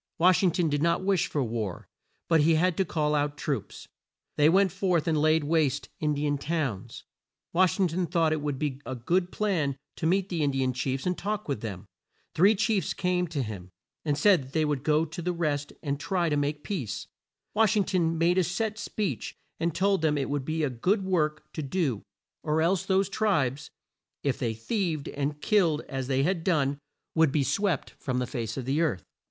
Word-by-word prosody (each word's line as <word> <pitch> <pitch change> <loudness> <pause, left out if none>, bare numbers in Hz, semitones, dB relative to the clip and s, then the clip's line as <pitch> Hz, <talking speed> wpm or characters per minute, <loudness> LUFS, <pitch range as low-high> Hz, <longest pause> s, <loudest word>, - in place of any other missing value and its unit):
Wash 180 0 +5
ing 190 - +4
ton 170 0 +1
did 145 -1 0
not 170 +3 +2
wish 190 -2 +2
for 145 - -1
war, 110 -6 -4 0.4
but 165 -2 +4
he 160 +2 +4
had 175 +2 +2
to 190 - +2
call 150 -3 0
out 145 0 0
troops. - - -4 0.5
They 150 +1 +5
went 190 +2 +4
forth 180 -3 0
and 160 - +2
laid 155 +1 +3
waste 145 -2 +1
In 150 -1 0
di 145 +1 -1
an 145 -1 0
towns. 140 - -3 0.5
Wash 185 +2 +3
ing 190 - +4
ton 175 +2 -1
thought 165 -2 +2
it 155 - -2
would 145 -2 -2
be 140 -1 -3
a 130 - -5
good 175 +9 0
plan 165 -10 0 0.2
to 160 - 0
meet 190 +3 +1
the 170 -3 -1
In 145 - +2
di 135 -1 0
an 130 0 0
chiefs 130 +1 -2
and 180 0 +1
talk 210 +2 -3
with 140 -7 -2
them. 100 -3 -6 0.5
Three 195 +6 +5
chiefs 210 -1 0
came 180 -1 0
to 150 -5 -2
him, 100 -5 -7 0.3
and 145 -2 0
said 145 -7 +3
they 155 -1 +2
would 145 -3 -1
go 155 +2 +2
to 160 +2 -7
the 180 +1 -1
rest 150 -4 -1
and 140 -2 -2
try 175 +1 0
to 150 - +1
make 145 +1 -1
peace. 145 - -4 0.5
Wash 215 0 +3
ing 205 - +4
ton 165 -4 0
made 175 +3 +3
a - - +4
set 210 +5 -2
speech 210 -2 -3 0.2
and 165 -1 -1
told 195 -1 +2
them 155 -2 +2
it 140 0 -2
would 145 -2 -1
be 160 +1 -1
a 145 - +1
good 190 - 0
work 155 -5 0
to - - -3
do, 140 - -1 0.4
or 155 +1 +1
else 185 +2 +1
those 190 0 +3
tribes, 150 - 0 0.5
"if 140 -2 0
they 115 -3 -1
thieved 160 - -2
and 145 +1 -3
killed 170 -8 +3
as 135 -2 -5
they 135 0 +1
had 170 +1 0
done, 145 -6 +1 0.3
would 160 -3 +4
be 145 0 +2
swept 170 - 0
from 130 -1 -2
the 125 - 0
face 115 -3 -4
of 130 - -4
the 140 +5 +1
earth." 150 - 0
155 Hz, 215 wpm, -28 LUFS, 140-180 Hz, 0.5 s, Wash